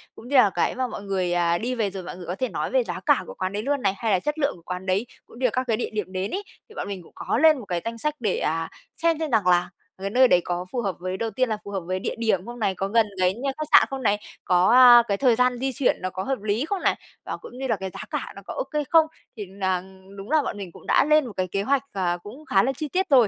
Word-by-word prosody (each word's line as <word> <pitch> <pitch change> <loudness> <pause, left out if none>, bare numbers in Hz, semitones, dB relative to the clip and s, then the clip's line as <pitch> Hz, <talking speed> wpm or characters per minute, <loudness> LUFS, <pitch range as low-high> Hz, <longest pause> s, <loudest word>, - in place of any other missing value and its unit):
cũng 230 - -12
như 280 - -2
là 250 -6 +7
cái 175 - 0
mà 255 0 -1
mọi 235 - -7
người, 190 -3 -1
ờ, 170 -1 +2
đi 245 +6 -2
về 220 -4 0
rồi 190 -1 -6
mọi 180 0 -8
người 180 - -9
có 175 +2 -3
thể 255 +4 -2
nói - - -3
về - - +3
giá - - -5
cả - - +4
của - - -7
quán 185 +1 -3
đấy 205 +1 -3
luôn 280 +1 0
này, 195 -3 +2
hay 225 +1 -1
là 190 - +3
chất 295 - -3
lượng 280 -1 +1
của 175 - -16
quán 180 +1 -5
đấy 190 +4 +1 0.2
cũng 235 - -15
như 260 - 0
là 245 - +3
các 255 - +1
cái 225 -2 +1
địa 240 - -2
điểm 210 -3 -3
đến 190 +1 -3
ấy. 400 - -3 0.3
Thì 440 - -15
bọn - - -4
mình 195 -3 -6
cũng - - -18
có - - -1
lên 310 +1 +5
một 235 - -9
cái 175 -3 -2
danh 230 0 -4
sách 300 +5 -2
để, 215 -6 0
à, 165 +1 -1 0.3
xem 330 -1 +1
xem 315 -3 -2
rằng 215 -5 +2
là 175 -1 +3 0.3
cái 195 - -2
nơi 255 +5 +5
đấy 180 - +4
có 175 0 -3
phù 245 - -1
hợp 195 -5 -2
với 185 +1 -3
đầu 225 +2 -2
tiên 255 0 0
là 215 - -1
phù 200 - -8
hợp 195 - -1
với 185 +1 -2
địa - - -3
điểm 215 -5 0
không 240 0 -8
này, 200 -4 0
có 195 - -2
gần 225 +2 +3
cái 185 0 +3
nh 230 - -10 0.2
khách 310 0 -4
sạn - - +7
không 270 -2 -5
này, 205 -2 +3 0.3
có, 180 +1 +4
à, 245 -1 +9
cái 200 - 0
thời 250 -2 +4
gian 250 +1 +2
di 265 +1 -1
chuyển 270 0 +1
nó 185 - -2
có 185 +1 -5
hợp 265 -2 -2
lý 215 +5 0
không 385 +2 -3
này, - - +2 0.3
và - - -4
cũng 245 - -12
như 265 +1 -3
là 235 - +2
cái 190 -1 -5
giá - - -8
cả - - -4
nó - - -9
có - - -6
okay 300 -12 -2
không? 325 -1 +6 0.3
Thì 210 - -5
là 190 -1 -2 0.3
đúng 195 +7 -8
là 310 -1 +4
bọn 275 - -4
mình 195 -4 -7
cũng - - -15
đã - - +4
lên 305 -1 +4
một 235 - -7
cái 185 0 0
kế 195 +2 -2
hoạch, 275 +4 +1
ờ, 180 -3 0
cũng 260 +9 -11
khá 195 -9 +3
là 265 - +1
chi 300 +3 -4
tiết 370 +4 -1
rồi, 250 -6 +6
220 Hz, 320 wpm, -24 LUFS, 185-260 Hz, 0.3 s, à